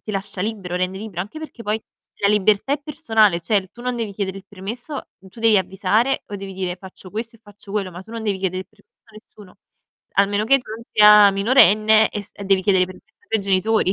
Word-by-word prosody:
ti 215 Hz, -, -6 dB
lascia 195 Hz, -1 st, -4 dB
libero, 195 Hz, -3 st, -3 dB
rende 185 Hz, +1 st, -2 dB
libro. 200 Hz, -5 st, -6 dB
Anche 210 Hz, +12 st, -6 dB
perché 305 Hz, -6 st, -9 dB
poi 215 Hz, +1 st, -2 dB, 0.4 s
la 200 Hz, -, +3 dB
libertà 210 Hz, +4 st, +2 dB
è 290 Hz, -, -7 dB
personale, 225 Hz, -, +2 dB
cioè 200 Hz, +4 st, +1 dB
l 185 Hz, -, -15 dB
tu 240 Hz, -, -13 dB
non 250 Hz, -1 st, -2 dB
devi 215 Hz, -4 st, -4 dB
chiedere 195 Hz, -1 st, -3 dB
il 195 Hz, -, -16 dB
permesso 230 Hz, +9 st, -7 dB
tu 190 Hz, +5 st, -15 dB
devi 225 Hz, -2 st, +5 dB
avvisare 195 Hz, +7 st, 0 dB
o 205 Hz, -, -6 dB
devi 195 Hz, -1 st, -8 dB
dire: 185 Hz, -1 st, -3 dB
"Faccio 185 Hz, 0 st, -12 dB
questo 230 Hz, +2 st, -5 dB
e -, -, -31 dB
faccio 205 Hz, -1 st, -14 dB
quello." 200 Hz, -3 st, -2 dB
Ma 180 Hz, +1 st, -9 dB
tu 220 Hz, -, -14 dB
non 230 Hz, -1 st, -5 dB
devi 205 Hz, -3 st, -1 dB
chiedere 185 Hz, -1 st, -2 dB
il -, -, -31 dB
permesso 210 Hz, -2 st, -31 dB
a 225 Hz, -, -23 dB
nessuno, 205 Hz, -3 st, -16 dB, 0.6 s
almeno 200 Hz, +1 st, +2 dB
che 275 Hz, +5 st, +4 dB
tu 245 Hz, -, -13 dB
non 230 Hz, +1 st, -11 dB
sia 210 Hz, -1 st, +8 dB
minorenne 215 Hz, 0 st, +5 dB
e 205 Hz, -, -4 dB
s 205 Hz, -, -20 dB
e 200 Hz, -, -9 dB
devi 190 Hz, -1 st, +2 dB
chiedere 190 Hz, -2 st, +3 dB
permesso 185 Hz, -, -14 dB
ai 455 Hz, -, -31 dB
tuoi 220 Hz, -, 0 dB
genitori. 195 Hz, +1 st, +1 dB
205 Hz, 235 wpm, -21 LUFS, 190-220 Hz, 0.6 s, sia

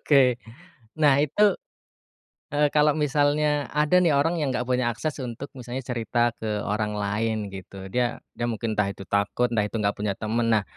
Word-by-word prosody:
Oke, 135 Hz, -4 st, +4 dB, 0.6 s
nah 145 Hz, -3 st, +5 dB
itu, 180 Hz, +8 st, +2 dB, 1.1 s
eee, 145 Hz, 0 st, +4 dB
kalau 150 Hz, 0 st, +5 dB
misalnya 150 Hz, 0 st, +1 dB
ada 150 Hz, +4 st, +3 dB
nih 165 Hz, -, +4 dB
orang 165 Hz, +5 st, +2 dB
yang 140 Hz, -3 st, 0 dB
enggak 125 Hz, 0 st, -2 dB
punya 125 Hz, -2 st, +1 dB
akses 150 Hz, +5 st, -4 dB
untuk 125 Hz, +3 st, -6 dB
misalnya 125 Hz, +1 st, -5 dB
cerita 120 Hz, -1 st, 0 dB
ke 105 Hz, -2 st, -2 dB
orang 105 Hz, +1 st, -1 dB
lain 105 Hz, +1 st, -1 dB
gitu. 95 Hz, 0 st, -9 dB
Dia 120 Hz, -1 st, 0 dB, 0.2 s
dia 120 Hz, -, -2 dB
mungkin 110 Hz, 0 st, -3 dB
entah 100 Hz, -2 st, +1 dB
itu 100 Hz, -, -10 dB
takut, 100 Hz, +4 st, +1 dB
entah 110 Hz, -3 st, +2 dB
itu -, -, -9 dB
enggak 100 Hz, 0 st, 0 dB
punya 105 Hz, -1 st, 0 dB
temen, 115 Hz, +2 st, 0 dB
nah 105 Hz, -3 st, +3 dB
120 Hz, 180 wpm, -25 LUFS, 105-145 Hz, 1.1 s, nah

